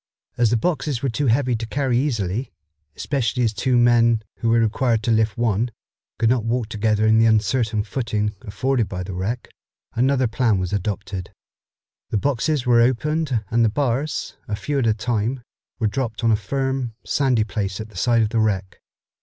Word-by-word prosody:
As 120 -2 +3
the 120 - +2
boxes 145 -2 -1
were 135 - +1
too 140 +5 -1
heavy 125 +1 +2
to 115 0 -4
carry 135 0 0
easily, 120 -3 -1 0.4
especially 130 -3 -1
as 115 -2 +1
two 125 +4 +1
men, 115 -2 +4
who 115 - -1
were 115 +1 +4
required 115 +1 +1
to 120 - +1
lift 110 0 +2
one, 115 0 +1 0.5
could 115 - +2
not 120 -1 +2
walk 115 -1 -1
together 110 0 +1
in 110 0 +5
the 115 - +5
uncertain 110 0 +1
footing 105 -2 -2
afforded 120 +2 -1
by 90 -1 -4
the 95 +1 -6
wreck, 95 +7 -3 0.4
another 130 +2 +2
plan 115 -2 +1
was 95 +1 -3
adopted. 100 -1 -3 0.8
The - - 0
boxes 140 +3 0
were 120 -1 +5
opened 130 0 +1
and 115 0 +3
the 115 - +4
bars, 135 +5 -1
a 105 - -2
few 140 +8 -2
at 120 - +1
a 110 - +3
time, 120 +2 -1 0.3
were 115 - -1
dropped 115 +1 -2
on 115 - +4
a - - +5
firm, 130 +2 -2
sandy 130 -6 +2
place 100 -3 -3
at 110 0 -6
the 105 - -19
side 115 +5 +2
of 105 - 0
the 115 - 0
wreck. 100 -4 -1
115 Hz, 185 wpm, -22 LUFS, 110-125 Hz, 0.8 s, in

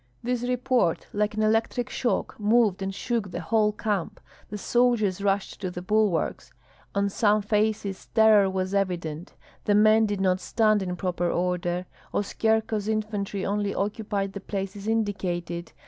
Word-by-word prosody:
This 245 0 -1
report, 250 -6 +1
like 210 +1 0
an 215 - 0
electric 225 +3 +1
shock, 245 - -1
moved 210 -2 +3
and 195 0 -2
shook 215 +1 -2
the 175 - -5
whole 210 +4 +2
camp; 205 -4 -2 0.3
the 210 - -5
soldiers 215 -4 +1
rushed 200 +1 -1
to 185 - -2
the 180 0 -7
bulwarks. 210 -3 0 0.4
On 200 0 +2
some 210 +1 +2
faces 210 -2 -1
terror 220 -3 +5
was 190 0 -2
evident; 175 -4 -2 0.3
the 205 - +3
men 215 +1 +5
did 205 -1 -2
not 185 -1 +2
stand 215 0 +2
in 180 -1 -3
proper 175 -2 -1
order; 180 0 -1 0.3
Oskyerko's 220 0 0
infantry 210 -2 -2
only 205 0 -1
occupied 205 -1 -2
the 200 - -6
places 195 +1 -5
indicated. 185 -6 -2
205 Hz, 145 wpm, -26 LUFS, 190-220 Hz, 0.4 s, terror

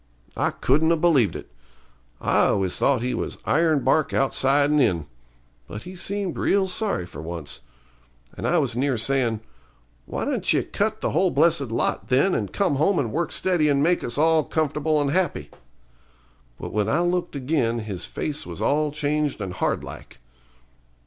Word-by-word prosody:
I - - +1
couldn't 155 +5 +2
'a - - +4
believed 155 - +3
it. - - -8 0.7
I - - +3
always 95 -2 0
thought 130 -4 +2
he 125 0 -1
was 115 - -3
ironbark 155 -2 +2
outside 140 +1 +2
and 150 -1 +4
in. 90 - +1 0.6
But 105 +2 -8
he 185 - -9
seemed 195 0 -3
real 195 -1 +2
sorry 190 - -1
for 80 -3 -9
once. 80 -3 -6 0.7
And - - -3
I - - +3
was - - +1
near 130 0 0
sayin', 115 -2 0 0.7
'Why - - -3
don't - - 0
ye - - +2
cut 215 +1 -2
the - - -1
whole 185 0 +2
blessed 150 -3 +2
lot, 115 - -1
then, 140 +9 +3
and 100 -3 -2
come 190 -8 0
home 175 +6 +2
and 120 -6 0
work 170 +3 -1
steady 175 -5 +1
and 140 0 +2
make 175 +2 +2
us 120 - -3
all 160 +1 +4
comfortable 155 0 0
and 140 -1 0
happy?' 185 +2 -1 1.1
But - - -7
when 105 0 0
I 155 - +2
looked 175 -2 -1
again 125 -4 0
his 100 -5 -5
face 150 0 -4
was - - -8
all 150 +1 +1
changed 150 -1 -1
and 95 -3 -4
hard - - -1
like. - - -10
145 Hz, 175 wpm, -24 LUFS, 120-165 Hz, 1.1 s, a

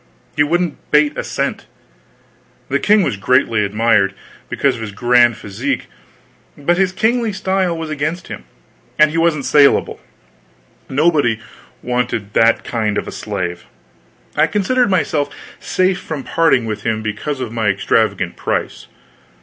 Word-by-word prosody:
He - - +2
wouldn't 170 +2 +1
bate 150 0 +3
a - - -3
cent. - - -3 1.0
The 140 - +1
king 210 +3 +4
was 105 - -1
greatly 115 0 +2
admired, 105 -1 +2 0.3
because 140 -2 +1
of 115 - -8
his 110 -2 -6
grand 120 +1 +3
physique, 100 -1 -3 0.7
but 175 +5 +1
his 190 -1 +2
kingly 225 +3 +1
style 190 -3 -1
was 160 -1 -5
against 155 +4 -3
him, - - -8 0.5
and 155 0 +5
he 165 - 0
wasn't 165 -4 +1
salable; 145 -2 +3 0.9
nobody 140 -5 +2 0.4
wanted 125 -4 -2
that 115 0 +3
kind 110 -3 -1
of - - -3
a - - -5
slave. 85 -1 -4 0.7
I 155 +2 +3
considered 225 +7 +1
myself 155 -6 0 0.3
safe 185 0 0
from 150 -4 -5
parting 165 -8 +2
from 105 - -17
him 110 0 -4
because 110 +7 -3
of 125 -4 -4
my 115 -2 -1
extravagant 95 -1 +1
price. - - -3
145 Hz, 140 wpm, -17 LUFS, 115-170 Hz, 1.0 s, and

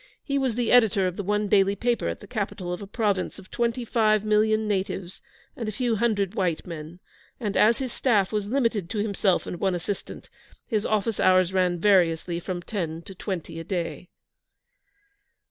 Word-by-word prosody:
He 280 -2 0
was 255 -4 -1
editor 225 -5 +4
of 180 -1 -1
the - - -3
one 210 +2 0
daily 195 0 +3
paper 235 +3 0
at - - -4
the - - -10
capital 195 -5 -3
of 180 - -6
a 200 - -7
province 205 -3 -1
of 185 - -14
twenty 235 0 -1
five 215 -2 +2
million 215 0 +2
natives 190 -2 -3 0.3
and 230 -3 -4
a - - -3
few 230 +1 0
hundred 205 -4 +1
white 180 -7 -1
men, 165 0 -8 0.4
and 210 -5 -3
as 225 +2 +5
his 260 -3 -4
staff 210 -7 +2
was 210 -2 -1
limited 230 -7 0
to 220 - -4
himself 200 -3 +1
and 175 - -6
one 190 -2 +1
assistant, 175 +4 -5 0.4
his 215 -4 -1
office 215 0 0
hours 185 0 +4
ran 180 -2 +2
variously 170 -3 +2
from 175 0 -5
ten 170 -6 -4
to 195 - -9
twenty 180 -3 -5
a - - -5
day. 175 0 -4
200 Hz, 180 wpm, -25 LUFS, 185-220 Hz, 0.4 s, as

